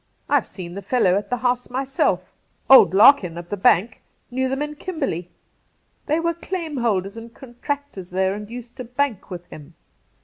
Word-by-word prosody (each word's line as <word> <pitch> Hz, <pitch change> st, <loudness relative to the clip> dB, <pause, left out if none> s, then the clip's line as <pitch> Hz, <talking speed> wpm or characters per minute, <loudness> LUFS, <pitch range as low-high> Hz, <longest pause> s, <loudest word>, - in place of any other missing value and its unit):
I've -, -, +2 dB
seen 175 Hz, -3 st, -8 dB
the 200 Hz, -, -6 dB
fellow 195 Hz, -3 st, +2 dB
at 205 Hz, -, -2 dB
the 250 Hz, -, 0 dB
house 245 Hz, 0 st, -1 dB
myself 265 Hz, +2 st, -1 dB, 0.4 s
Old 265 Hz, -, +9 dB
Larkin, 200 Hz, -6 st, +6 dB
of 175 Hz, 0 st, -8 dB
the -, -, -2 dB
Bank, 200 Hz, +3 st, +2 dB, 0.3 s
knew 260 Hz, +1 st, 0 dB
them 270 Hz, +2 st, -1 dB
in 300 Hz, 0 st, -5 dB
Kimberley. 290 Hz, -, -4 dB, 0.8 s
They 310 Hz, +2 st, +1 dB
were 335 Hz, 0 st, 0 dB
claim 335 Hz, -3 st, -5 dB
holders 205 Hz, -4 st, -1 dB
and 230 Hz, +1 st, -9 dB
contractors 265 Hz, -5 st, -6 dB
there 190 Hz, +1 st, 0 dB
and 210 Hz, +1 st, -7 dB
used 245 Hz, +1 st, -9 dB
to 255 Hz, -, -5 dB
bank 250 Hz, -3 st, -2 dB
with 175 Hz, -2 st, -7 dB
him. 155 Hz, +2 st, -12 dB
240 Hz, 175 wpm, -22 LUFS, 190-275 Hz, 0.8 s, Old